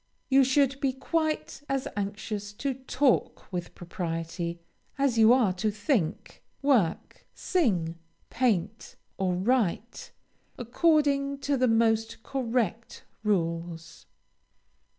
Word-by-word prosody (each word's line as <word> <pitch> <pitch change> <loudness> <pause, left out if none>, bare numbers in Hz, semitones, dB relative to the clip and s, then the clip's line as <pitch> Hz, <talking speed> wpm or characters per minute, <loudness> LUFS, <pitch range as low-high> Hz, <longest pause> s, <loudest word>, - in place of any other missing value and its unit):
You 270 0 +6
should 270 +1 +2
be 270 -2 +1
quite 310 +2 -2
as 270 -1 -1
anxious 205 0 -4
to 275 +6 -2
talk 260 -4 0
with 175 -1 -4
propriety 170 0 -4 0.4
as 275 -4 +1
you 220 +1 +7
are 240 -7 +4
to 200 +4 -1
think, 210 - -2 0.2
work, 245 - +1
sing, 180 - 0 0.3
paint, 220 -4 -1 0.2
or 185 -2 +1
write, 225 +2 -1 0.5
according 280 +2 +2
to 285 0 0
the 255 -1 +2
most 225 -1 +1
correct 235 -4 -2 0.2
rules. 170 -4 -2
225 Hz, 105 wpm, -28 LUFS, 185-270 Hz, 0.5 s, you